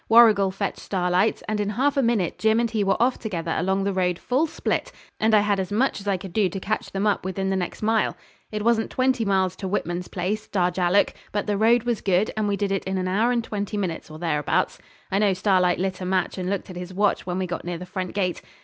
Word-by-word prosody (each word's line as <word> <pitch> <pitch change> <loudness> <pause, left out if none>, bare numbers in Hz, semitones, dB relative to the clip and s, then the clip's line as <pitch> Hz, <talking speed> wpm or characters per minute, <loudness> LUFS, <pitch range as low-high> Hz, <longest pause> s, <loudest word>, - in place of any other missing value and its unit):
Warrigal 220 -4 +7
fetched 195 +1 -3
Starlight's, 180 +2 0
and 215 -1 -1
in 205 -1 0
half 270 +7 +1
a 275 - +3
minute 230 -8 0
Jim 220 +1 +3
and 235 -1 0
he 215 -3 +1
were 195 - +1
off 245 +2 +2
together 170 -7 -3
along 190 +3 0
the 200 0 0
road 180 -2 +1
full 265 - 0
split, - - -2 0.3
and 220 0 +4
I 210 - +6
had 205 -1 +1
as 190 +1 -3
much 235 +1 +1
as 200 - -10
I 195 -2 +2
could 185 -1 -9
do 205 -4 +2
to 195 - -5
catch 215 +3 -2
them 195 +2 -1
up 210 - +1
within 190 +1 -2
the - - +1
next 185 +2 -3
mile. 220 0 +1 0.3
It 210 -1 -3
wasn't 230 -1 +2
twenty 255 -2 +1
miles 190 -2 +1
to 190 - -4
Whitman's 180 -2 -2
place, 195 +4 -3
Darjallook, 180 0 +2 0.2
but 205 - -1
the 205 - 0
road 225 +3 +4
was 240 -3 -1
good, 195 +2 +2
and 215 -1 0
we 200 -1 0
did 200 -1 -1
it 195 - 0
in 190 0 -1
an 185 0 -1
hour 215 +6 +2
and 235 -1 +1
twenty 210 -1 -4
minutes, 180 -6 -3
or 155 - -9
thereabouts. 155 -3 0 0.3
I 195 - +2
know 205 -2 +3
Starlight 185 -2 +2
lit 190 0 -2
a - - -3
match 185 +1 0
and 180 0 -2
looked 195 -1 -3
at - - -10
his 180 +1 -7
watch 200 -1 +1
when 180 0 -2
we 190 - -1
got 175 0 -4
near 175 0 -4
the 180 - -8
front 185 0 -5
gate. 185 -4 -1
195 Hz, 255 wpm, -24 LUFS, 185-215 Hz, 0.3 s, Warrigal